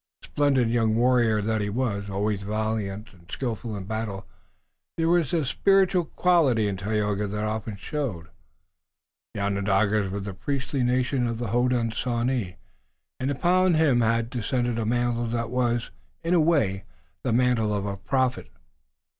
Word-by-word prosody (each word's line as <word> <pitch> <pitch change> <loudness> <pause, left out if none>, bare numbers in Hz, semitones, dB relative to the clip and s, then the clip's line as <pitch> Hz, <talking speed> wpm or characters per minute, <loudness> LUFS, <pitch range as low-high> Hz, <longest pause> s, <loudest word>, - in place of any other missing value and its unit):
Splendid 140 -4 +2
young 115 -1 +1
warrior 120 -3 +3
that 110 0 0
he 105 - -1
was, 100 -3 -2
always 100 +1 -1
valiant 105 0 -3
and 85 0 -19
skillful 115 -2 -4
in 95 - -6
battle, 105 -1 -4 0.7
there 165 0 +1
was 170 -5 +2
a 165 -4 +1
spiritual 190 +3 +3
quality 150 -13 +2
in 100 - -1
Tayoga 105 +1 -1
that 105 +1 -3
often 110 0 -3
showed. 100 - -4 1.1
The - - -3
Onondagas 100 0 +1
were 100 +2 -3
the 100 0 -5
priestly 135 +5 -2
nation 125 0 +1
of 115 -1 -2
the 120 -2 -3
Hodenosaunee 120 -2 0 0.6
and 130 +1 -1
upon 180 +5 +3
him 145 -6 +3
had 115 +1 +1
descended 120 0 -1
a 110 - -1
mantle 120 0 0
that 115 0 -2
was, 120 -2 0 0.3
in 165 +2 0
a 175 - +5
way, 115 - +2 0.4
the 125 - -1
mantle 120 -2 +2
of 100 -1 -1
a 100 -1 -3
prophet. 130 +4 -1
115 Hz, 150 wpm, -25 LUFS, 105-130 Hz, 1.1 s, a